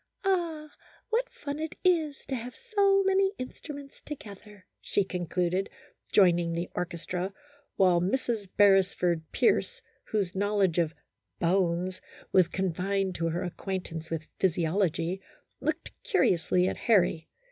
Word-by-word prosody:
" - - -20
Ah! 330 -5 0 0.4
what - - +1
fun 285 0 -6
it 315 +2 -4
is 320 -6 +2
to 270 - -5
have 245 0 -4
so 400 -4 +3
many 390 0 +3
instruments 280 +2 -8
together," 210 -7 -10 0.2
she 200 - +1
concluded, 180 +1 -1 0.4
joining 175 -4 +4
the 170 +1 -3
orchestra, 180 +1 -3 0.4
while 180 -3 +4
Mrs. 210 0 -1
Beresford 190 -4 +4
Pierce, 480 - +2 0.3
whose 200 -5 -1
knowledge 200 -3 +1
of 165 -1 0 0.2
" - - -52
bones 180 +1 +1
" - - -21
was 185 -3 +6
confined 190 +1 -1
to 165 -1 -1
her 165 +2 -1
acquaintance 175 -3 -5
with 160 -1 -3
physiology, 175 0 +1 0.4
looked 310 +4 -2
curiously 180 - +2
at - - -2
Harry. 180 -7 +2
195 Hz, 130 wpm, -29 LUFS, 175-280 Hz, 0.4 s, was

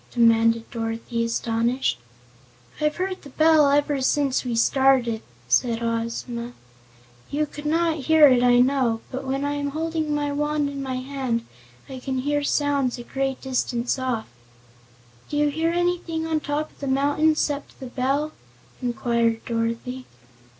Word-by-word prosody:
demanded 230 -1 +3
Dorothy, 230 0 -3
astonished. 230 - 0 0.8
"I've 300 0 +1
heard 370 +1 -3
the 280 - -12
bell 310 0 +5
ever 290 -1 +2
since 275 0 +1
we 245 -2 -2
started," 245 -1 +3 0.3
Ozma 230 - +2
told 230 +1 -3
her. 245 - -13 0.8
"You 300 +2 0
could 295 0 -7
not 325 +1 +2
hear 315 -2 +7
it, 255 -3 +4
I 245 0 +5
know, 250 -4 +2
but 265 +1 -5
when 270 +1 -1
I 285 - 0
am 285 0 -2
holding 315 0 -2
my 290 -1 -1
wand 295 0 0
in 280 -1 -5
my 260 -1 -3
hand 255 -3 -2 0.4
I 265 -1 -7
can 260 +1 -3
hear 290 +2 0
sounds 285 -3 +1
a 240 - -7
great 270 +1 -2
distance 250 -1 -1
off." 250 -4 -2 1.0
"Do 295 - -2
you 295 0 +3
hear 320 +3 0
anything 345 -2 -1
on 320 -1 0
top 295 +1 -3
of - - -26
the 280 - -4
mountain 290 +4 +2
'cept 290 -2 -2
the 265 - -7
bell?" 270 +4 -1 0.5
inquired 235 -2 0
Dorothy. 235 +2 -3
270 Hz, 155 wpm, -24 LUFS, 240-295 Hz, 1.0 s, hear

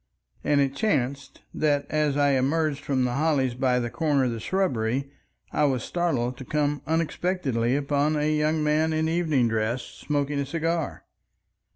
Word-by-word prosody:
And 145 - +2
it 140 -1 +1
chanced 140 - -1
that 145 -2 +1
as 150 -2 +1
I 145 -1 +3
emerged 140 +2 +1
from 130 -2 0
the 125 - -1
hollies 140 -3 +1
by 125 0 +1
the 120 -1 -3
corner 150 -4 +1
of 125 - +1
the 115 - -4
shrubbery 135 - -1 0.4
I 150 - +2
was 130 -4 0
startled 130 -8 -1
to - - -7
come 145 +1 -1
unexpectedly 155 -6 0
upon 145 +1 +1
a 150 +1 +1
young 155 +1 +1
man 155 +1 +2
in 160 0 +1
evening 160 -7 +2
dress 115 +2 -1
smoking 145 -1 -2
a 140 - -1
cigar. 165 +1 -2
145 Hz, 165 wpm, -26 LUFS, 130-155 Hz, 0.4 s, I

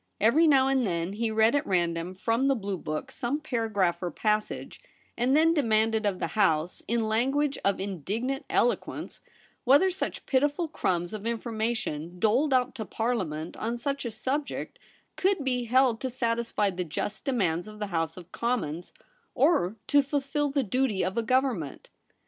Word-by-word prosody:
Every 285 +10 +5
now 270 -3 +5
and 270 -1 +2
then 175 -2 -1
he 225 +2 -1
read 220 +2 +3
at 285 - 0
random 175 -1 0
from 230 +7 +1
the 275 - +3
blue 200 -5 -3
book 155 -1 -4
some 250 +5 -2
paragraph 215 - 0
or 180 - -1
passage, 210 +6 -2 0.3
and 255 +4 +2
then 325 +1 +5
demanded 220 -6 +2
of 195 -2 0
the - - -2
House, 165 -5 +1
in 230 0 0
language 270 +6 +1
of 200 - +1
indignant 205 - -3
elo - - +3
quence, - - -8 0.4
whether 285 +9 +5
such 370 - -4
pitiful 290 +5 +1
crumbs 175 - -1
of 215 - -5
infor 230 +1 -3
mation 180 -7 -2
doled 245 +9 +3
out 255 -1 +2
to 240 -4 -5
Parliament 185 -9 -2
on 230 +2 -2
such 275 +3 -2
a 240 - -2
subject 265 +6 -3 0.4
could 380 -5 +1
be 250 -2 0
held 250 -1 +3
to 260 - -1
satisfy 230 -4 0
the 180 0 -3
just 180 +6 -4
demands 185 -9 0
of 215 0 -10
the 210 -1 -3
House 165 0 -1
of 180 0 -11
Commons, 180 -9 -2 0.4
or 215 - +3
to 290 -1 +5
fulfil 285 +1 -1
the 275 0 +1
duty 250 -2 0
of 185 - -2
a 230 - +1
Government. 245 - -1
230 Hz, 170 wpm, -28 LUFS, 190-265 Hz, 0.4 s, Every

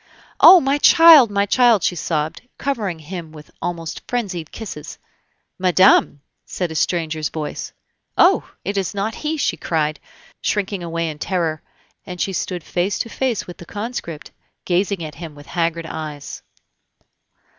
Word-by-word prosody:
"Oh! 370 - +10
my 275 -1 0
child! 325 -7 +8
my 200 0 +1
child!" 230 -2 +4
she 180 - +1
sobbed, 155 -2 -2 0.2
covering 220 -11 -2
him 160 +1 -8
with 155 -1 -13
almost 165 -2 -4
frenzied 195 -10 -3
kisses. 180 -9 -8 0.6
"Madame!..." 185 -5 +4 0.2
said 180 -3 -4
a - - -4
stranger's 160 -2 -1
voice. 155 -2 -5 0.5
"Oh! - - +4 0.2
it 200 +2 -2
is 195 0 -2
not 205 +3 -2
he!" 310 +5 -3
she 285 - 0
cried, 155 -2 -1 0.4
shrinking 200 -2 -1
away 165 -1 -2
in 150 -2 -6
terror, 165 -4 -1 0.4
and 180 -1 -8
she 195 - -1
stood 180 -2 -3
face 180 +3 -1
to 230 - -3
face 255 -4 -2
with 175 - -10
the 175 - -11
conscript, 205 -8 -6 0.3
gazing 185 0 0
at 155 -1 -6
him 160 -3 -8
with 145 0 -13
haggard 165 0 -2
eyes. 155 -3 -7
175 Hz, 150 wpm, -20 LUFS, 160-205 Hz, 0.6 s, Oh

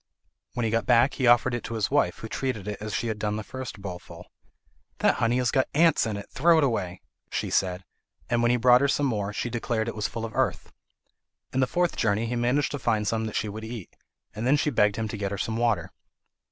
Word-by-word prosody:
When 120 - -1
he 110 - 0
got 115 +1 0
back 120 +2 +4
he 130 - 0
offered 120 +1 +5
it 120 - -3
to 115 - -5
his 110 -3 -1
wife, 90 - +2
who 110 - -7
treated 110 -4 -3
it 105 -1 -5
as 105 0 -5
she 110 - -1
had 110 -2 -3
done 105 -1 -1
the 110 - -4
first 125 -5 -8
bowlful. 90 -3 -8 0.7
"That - - +2
honey 115 +1 +1
has 125 -2 +1
got 130 - +2
ants 160 -5 +4
in 105 -2 -3
it: 100 - -8
throw 165 +4 +4
it 160 - +4
away," 95 -9 -1 0.3
she - - -3
said, 90 -1 0 0.4
and 120 0 +1
when 120 - +3
he 125 - +3
brought 125 +1 +5
her 140 - +3
some 145 +1 +1
more, 105 -6 -1
she 120 +3 -3
declared 115 -2 -1
it 115 - -3
was 105 -2 -1
full 115 -1 -5
of 110 - -7
earth. - - -1 0.8
In 130 - +1
his 130 - +1
fourth 175 0 +1
journey 110 0 +1
he 120 +2 -2
managed 125 +4 +1
to 145 - -4
find 110 -4 0
some 110 0 0
that 110 - -6
she - - 0
would 110 +2 -6
eat, 110 -4 -8 0.4
and 110 +3 -3
then 145 +3 +4
she 150 0 0
begged 105 -4 +3
him 110 -1 -2
to 110 - -5
get 100 -1 -2
her 100 - -4
some 110 +3 -2
water. 115 -2 0
115 Hz, 250 wpm, -26 LUFS, 105-125 Hz, 0.8 s, offered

